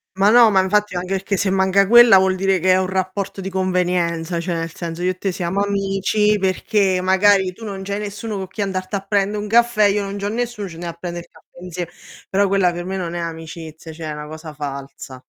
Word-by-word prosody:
Ma 195 +2 +4
no, 235 -1 +7
ma 195 -2 +3
infatti 205 0 0
anche 180 +2 -3
perché 195 +1 -1
se 200 - 0
manca 190 0 +3
quella 240 -3 +8
vuol 190 0 +2
dire 190 0 +1
che 185 +2 +3
è - - +4
un 185 0 0
rapporto 190 +1 -3
di 190 - -4
convenienza, 180 -2 -1
cioè 175 0 -3
nel 165 0 -4
senso 170 0 -6
io 185 - +2
e 185 - -8
te 195 0 -2
siamo 180 +2 -2
amici 200 +1 +1
perché 190 0 +1
magari 190 0 +3
tu 225 - -14
non 195 -3 -6
c'hai 200 +1 -3
nessuno 210 +1 -5
co' 190 - -5
chi 200 +3 -6
andarti 185 0 -3
a 195 - -2
prendè 205 0 +1
un 205 - -4
caffè, 235 -1 +3
io 205 0 +2
non 200 +1 -5
c'ho 200 - -3
nessuno, 230 -3 -3
ci 170 - -10
andiamo 170 0 -6
a - - -31
prendere 175 -1 -6
il - - -70
caffè - - -21 0.2
insiem 180 -1 -5 0.4
però 200 +1 +2
quella 195 -2 +2
per 175 0 -5
me 190 +1 -3
non 175 -2 -4
è 175 - -3
amicizia, 160 -1 -7
cioè 160 0 -8
è - - -3
una 150 0 -7
cosa 155 0 -9
falsa. 140 -2 -7
190 Hz, 240 wpm, -20 LUFS, 175-200 Hz, 0.4 s, quella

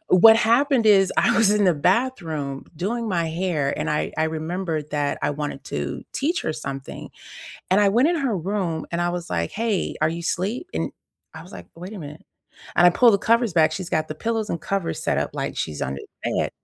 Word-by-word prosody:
what 220 +5 +8
happened 235 +1 +3
is 195 -2 +5
I - - +3
was 220 -3 +5
in 210 -1 +3
the 180 -3 +4
bathroom 160 - -1
doing 225 +7 -2
my 170 -3 0
hair, 160 -5 -1
and - - -1
I 150 - -1
I 160 - +3
remembered 160 -1 -3
that 145 -1 -1
I - - +1
wanted 145 0 -5
to - - -4
teach 320 +6 -1
her 155 - -1
something. 140 -3 -7 0.6
And 195 +2 +4
I 205 - +5
went 245 +9 +4
in 350 - +1
her 270 -9 0
room 175 -3 -2
and 170 - -1
I 175 - +1
was 175 -1 -5
like, 85 -1 -1
"Hey, 220 -4 -1
are 155 - +4
you 170 +1 -5
sleep?" 190 +8 -2
And 80 +1 -1 0.4
I - - -8
was - - -15
like, 90 - -10
"Wait 180 +5 -8
a - - -7
minute." 150 0 -10 0.5
And 175 - +7
I - - +8
pulled 235 +4 +5
the - - +2
covers 230 -2 +2
back, 160 -2 +4
she's 185 -2 -5
got 155 - 0
the 155 - -4
pillows 225 +2 -2
and 170 - -3
covers 195 -3 -2
set - - 0
up - - -1
like - - -3
she's 75 -2 -3
under 70 0 -3 0.2
the - - 0
bed. - - -3
180 Hz, 225 wpm, -23 LUFS, 155-220 Hz, 0.6 s, what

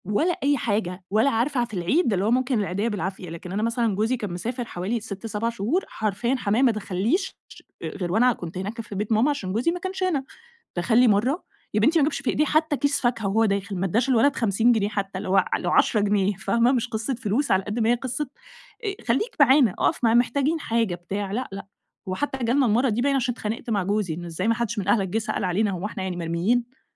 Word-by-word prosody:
ولا 305 - +1
أي 285 +1 +3
حاجة. 205 -6 -2
ولا 220 +7 +3
عارفة 250 +2 0
ع 240 - +2
في 235 - -16
العيد 205 - +1
اللي 190 +1 0
هو 220 - +2
ممكن 255 -1 +2
العيديّة 200 +2 -1
بالعافية. 190 -4 -4
لكن 170 +2 -8
أنا 205 +3 -1
مثلًا 230 -2 0
جوزي 225 +5 +1
كان 210 -6 -5
مسافر 235 +8 -4
حوالي 205 +4 -3
6، 205 -1 -8
7 225 +1 -1
شهور، 235 - -1
حرفيًا 220 +4 -1
حمايا 230 0 +1
ما 255 - +5
دخلّيش 215 - -1
ش - - -14 0.2
آآ، - - -2
غير 180 -4 -4
وأنا 245 +5 +4
كنت 175 -3 -8
هناك 205 +5 -4
في 215 - -9
بيت 210 +3 -3
ماما، 225 +6 +4
عشان 205 -11 -2
جوزي 240 +10 +1
ما 355 - -4
كانش 375 +1 -4
هنا. 325 -7 +1 0.5
دخل 220 +6 +1
لي 250 0 +6
مرّة 235 - +2 0.3
يا 210 - +2
بنتي 305 +10 +4
ما - - +4
جابش 295 - -2
في 275 - -1
إيديه 300 - +2
حتى 310 -1 +1
كيس 285 +1 0
فاكهة 235 -4 0
وهو 220 +3 +3
داخل، 200 -1 -1
ما 185 +1 -1
ادّاش 230 +8 +1
الولد 260 +3 +4
50 225 +1 +2
جنيه 210 -3 +1
حتى 195 -2 -3
اللي 190 - -5
هو 195 - +3
ع 190 - +2
لو 175 - -2
10 215 - +3
جنيه، 205 -1 +2
فاهمة؟ 235 +6 +2
مش 245 -2 0
قصة 225 +2 -2
فلوس، 240 +4 -1
على 190 0 +3
قد 210 +4 -3
ما 225 0 +2
هي 240 - +5
قصة، 260 +4 -3 0.6
آآ 395 -1 -2
خلّيك 270 - 0
معانا، 265 -6 +6
أقف - - +1
معانا 230 +1 +5
محتاجين 280 +6 +1
حاجة 230 - 0
بتاع، 195 +3 -4
لأ، 250 +5 -3
لأ. 195 0 -7 0.4
وحتى 270 +9 -2
جالنا 255 +4 +3
المرة 240 +4 +3
دي 225 +2 0
باين 280 +1 +2
عشان 255 -2 +1
اتخانقت 225 0 -5
مع 205 -4 +1
جوزي، 200 -2 -1
إن 175 +2 -6
إزاي 175 +4 -3
ما 230 - +4
حدّش 235 -2 -2
من 190 - -4
أهلك 200 -2 +3
جه 185 - -1
سأل 215 -1 -3
علينا، 200 +3 +1
هو 185 +1 -4
إحنا 210 -2 -4
يعني 185 -2 -3
مرميين! 220 +10 -1
225 Hz, 240 wpm, -24 LUFS, 195-250 Hz, 0.6 s, لي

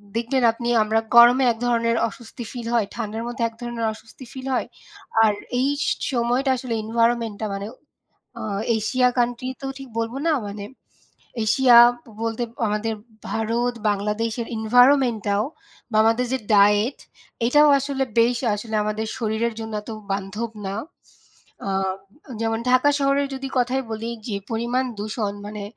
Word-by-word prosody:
দেখবেন 240 +2 0
আপনি 235 +1 -5 0.2
আমরা 220 +1 +1 0.2
গরমে 240 +2 +8
এক 225 - -5
ধরনের 230 -1 +1
অস্বস্তি 235 +2 -9
ফিল 240 -2 -6
হয় 220 -4 +2
ঠান্ডার 225 -1 -4
মধ্যে 240 0 -3
এক 230 - -10
ধরনের 240 -1 -3
অস্বস্তি 225 +4 -14
ফিল 260 0 -7
হয়। - - -1 0.6
আর 215 -1 +4 0.3
এই 270 - +2 0.2
স - - -1 0.3
সময়টা 245 +3 +1
আসলে 245 -2 -4
এনভায়রনমেন্টটা 230 -1 0
মানে 200 +1 -5 0.7
আ - - -5 0.3
এশিয়া 250 +4 +2
কান্ট্রি 245 +1 0
তো 270 - -4
ঠিক 270 - -9
বলবো 230 +3 -2
না 320 - +4
মানে 200 0 -6 0.8
এশিয়া 245 +2 +5 0.3
ব - - -16
বলতে 230 +1 -2 0.2
আমাদের 210 +2 -1 0.4
ভারত 235 +2 0 0.2
বাংলাদেশের 220 +3 -2
এনভায়রনমেন্টটাও 235 -3 +3 0.5
বা 215 - -1
আমাদের 230 +2 +2
যে 260 - +1 0.2
ডায়েট 205 +5 +4 0.5
এটাও 295 +4 +5
আসলে 270 -1 -1 0.2
বেশ 240 +1 +3 0.2
আসলে 220 +1 -6
আমাদের 215 +1 -2
শরীরের 225 0 -1
জন্য 220 0 -6
এত 225 - -10 0.2
বান্ধব 205 +4 -3 0.2
না। 195 - -3 0.9
আ - - -1 0.7
যেমন 225 0 0
ঢাকা 255 +3 +5
শহরের 275 0 +2
যদি 270 0 -5
কথাই 255 +2 +1
বলি, 225 +1 -4 0.2
যে 210 - -2 0.2
পরিমাণ 240 +3 0
দূষণ 210 -1 -3
মানে 210 0 -6
230 Hz, 145 wpm, -23 LUFS, 220-250 Hz, 0.9 s, গরমে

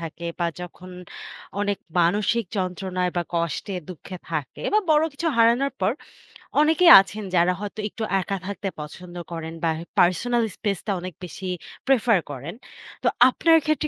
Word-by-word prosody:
থাকে 165 +1 -6
বা 175 - +1
যখন 180 +1 -9 0.7
অনেক 205 -1 0 0.2
মানসিক 205 +6 +2
যন্ত্রণায় 185 -1 -1
বা 175 - +2
কষ্টে, 170 +4 -2
দুঃখে 185 +1 -8
থাকে 155 -4 -4
বা 430 - +5
বড় 305 0 +5
কিছু 330 +4 -4
হারানোর 235 +4 +4
পর, 190 - +2 0.7
অনেকেই 320 +3 +6
আছেন 200 +2 -7
যারা 175 +1 +4
হয়তো 205 +1 -6
একটু 220 - -6 0.2
একা 195 +1 -3
থাকতে 200 0 -3
পছন্দ 175 +4 -9 0.2
করেন, 165 -1 -5
বা 165 - +3 0.3
personal 230 +7 +3
space 200 -5 -2
টা - - +1
অনেক 185 0 -6
বেশি 185 +2 -7 0.4
prefer 240 -5 +4
করেন। 140 +8 -7 0.5
তো - - +2 0.2
আপনার 325 +5 +4
ক্ষেত্রে 310 0 +1
190 Hz, 150 wpm, -24 LUFS, 175-235 Hz, 0.7 s, অনেকেই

